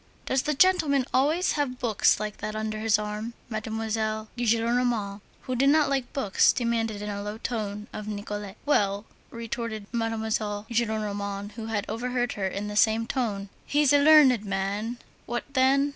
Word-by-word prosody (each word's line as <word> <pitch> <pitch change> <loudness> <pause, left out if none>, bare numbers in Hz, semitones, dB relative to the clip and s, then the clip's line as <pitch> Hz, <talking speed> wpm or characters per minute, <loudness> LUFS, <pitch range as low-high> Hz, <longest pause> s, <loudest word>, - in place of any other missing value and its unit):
"Does 260 0 +1
the 300 +2 -1
gentleman 290 -5 +4
always 305 +7 +2
have 280 -4 -1
books 225 -6 +2
like 215 0 -4
that 215 - -5
under 215 0 -3
his 220 -1 +3
arm?" 210 +2 -4 0.2
Mademoiselle 220 0 -2
Gillenormand, 230 -3 0 0.2
who 255 - -3
did 275 +3 +4
not 305 0 +4
like 265 -3 -1
books, 210 -9 +3
demanded 225 -3 -1
in 210 - -4
a 200 0 -4
low 210 +1 -5
tone 210 -3 -4
of 210 - -6
Nicolette. 205 -1 -5
"Well," 205 -7 +1 0.2
retorted 230 -2 -5
M. 235 - 0
Gillenormand, 215 -2 -2
who 220 +1 -7
had 210 -2 -2
overheard 245 +2 -1
her, 195 -2 -2
in 200 +2 -4
the 210 - -5
same 220 +1 +3
tone, 215 -6 -2 0.2
"he's 290 -1 +3
a 285 - +6
learned 285 -6 +6
man. 200 +4 -2 0.3
What 240 0 -2
then? 275 +2 +3
225 Hz, 160 wpm, -27 LUFS, 210-250 Hz, 0.3 s, a